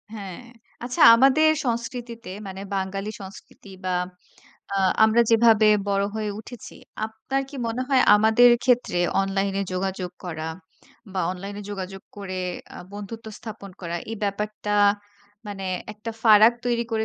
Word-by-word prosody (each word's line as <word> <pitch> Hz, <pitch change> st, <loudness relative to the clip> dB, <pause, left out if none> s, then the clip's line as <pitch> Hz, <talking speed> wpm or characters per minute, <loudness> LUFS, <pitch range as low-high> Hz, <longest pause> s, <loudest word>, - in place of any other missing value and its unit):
হ্যাঁ। 195 Hz, -4 st, -7 dB, 0.4 s
আচ্ছা 245 Hz, 0 st, -3 dB
আমাদের 270 Hz, +6 st, +5 dB, 0.2 s
সংস্কৃতিতে 235 Hz, -1 st, -4 dB, 0.2 s
মানে 190 Hz, 0 st, -7 dB
বাঙালি 195 Hz, +1 st, -3 dB
সংস্কৃতি 195 Hz, +1 st, -12 dB, 0.2 s
বা 185 Hz, -, 0 dB, 0.8 s
আ -, -, -1 dB, 0.3 s
আমরা 220 Hz, +2 st, +4 dB
যেভাবে 225 Hz, -1 st, +5 dB, 0.2 s
বড় 200 Hz, 0 st, +1 dB
হয়ে 215 Hz, -1 st, -2 dB
উঠেছি 240 Hz, +2 st, -11 dB, 0.3 s
আপনার 220 Hz, +5 st, -3 dB
কি 285 Hz, -, -13 dB
মনে 230 Hz, +3 st, -2 dB
হয় 270 Hz, -2 st, +4 dB
আমাদের 220 Hz, +3 st, +6 dB
ক্ষেত্রে 245 Hz, -7 st, +2 dB, 0.2 s
অনলাইন 195 Hz, 0 st, -1 dB
এ -, -, 0 dB
যোগাযোগ 185 Hz, -1 st, -3 dB
করা 160 Hz, -2 st, -4 dB, 0.6 s
বা 190 Hz, -, -1 dB
অনলাইন 195 Hz, +2 st, -6 dB
এ -, -, -8 dB
যোগাযোগ 195 Hz, -1 st, -6 dB
করে 195 Hz, -2 st, -6 dB, 0.4 s
আ -, -, -8 dB
বন্ধুত্ব 215 Hz, +2 st, -8 dB
স্থাপন 220 Hz, -4 st, -9 dB
করা 170 Hz, -2 st, -4 dB
এই 225 Hz, -, -4 dB
ব্যাপারটা 210 Hz, +1 st, -3 dB, 0.8 s
মানে 200 Hz, -2 st, -6 dB, 0.3 s
একটা 215 Hz, +2 st, -7 dB
ফারাক 220 Hz, 0 st, +7 dB
তৈরি 240 Hz, -1 st, +1 dB
করে 220 Hz, 0 st, 0 dB
210 Hz, 140 wpm, -24 LUFS, 195-230 Hz, 0.8 s, ফারাক